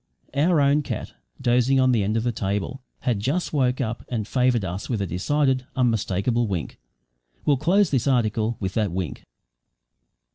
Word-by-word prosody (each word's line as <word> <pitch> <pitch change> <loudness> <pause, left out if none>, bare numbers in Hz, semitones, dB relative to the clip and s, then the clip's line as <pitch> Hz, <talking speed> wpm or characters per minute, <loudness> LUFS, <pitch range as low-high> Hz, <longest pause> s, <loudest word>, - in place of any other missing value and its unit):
Our 155 +4 +3
own 140 +1 +4
cat - - -5 0.3
dozing 125 +2 +3
on 130 0 +4
the 115 -4 +2
end 105 +3 0
of 110 - 0
the 120 - +1
table 105 +5 -3 0.2
had 120 -5 0
just 145 - -1
woke 130 -3 +1
up 115 -2 -3
and 110 -4 -2
favoured 125 -4 +2
us 95 +3 -5
with 115 -4 -1
a 100 - 0
decided, 130 - 0
unmistakable 115 -2 +1
wink. 90 -10 -4 0.7
We'll 145 - +3
close 190 +6 +3
this 130 -1 +1
article 115 -3 +1
with 95 -1 -3
that 105 -4 0
wink. 90 -2 -4
120 Hz, 170 wpm, -24 LUFS, 105-135 Hz, 0.7 s, own